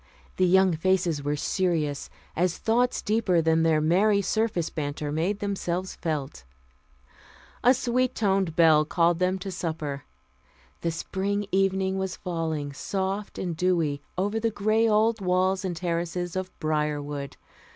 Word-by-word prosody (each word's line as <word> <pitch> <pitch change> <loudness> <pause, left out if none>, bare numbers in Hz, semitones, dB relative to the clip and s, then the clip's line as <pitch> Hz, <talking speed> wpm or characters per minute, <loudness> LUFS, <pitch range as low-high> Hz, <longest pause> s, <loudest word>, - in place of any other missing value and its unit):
The 185 - +3
young 190 0 +5
faces 175 -2 +1
were 145 +1 -1
serious 155 -3 -1 0.3
as 175 +1 +1
thoughts 245 +3 +1
deeper 210 -5 +2
than 160 0 +3
their 160 -1 +3
merry 195 +7 +3
surface 205 -4 0
banter 145 -1 -3
made 170 +7 0
themselves 185 -2 -2
felt. 140 - -4 1.2
A 250 +2 +6
sweet 255 0 0
toned 195 -5 +1
bell 160 -3 +6
called 170 +2 +2
them 185 +1 +1
to 190 +1 -6
supper. 155 -6 -4 0.8
The 170 - 0
spring 200 +5 -2
evening 190 0 +1
was 190 -1 -2
falling, 160 -5 -3
soft 195 +6 -3
and 175 -3 -3
dewy, 165 -5 +1 0.2
over 205 +4 0
the 230 +1 +1
gray 215 +2 +2
old 220 +1 +2
walls 185 +1 +1
and 180 -2 -2
terraces 175 +1 -2
of 185 0 -2
Briarwood. 150 -2 -2
180 Hz, 140 wpm, -26 LUFS, 160-195 Hz, 1.2 s, A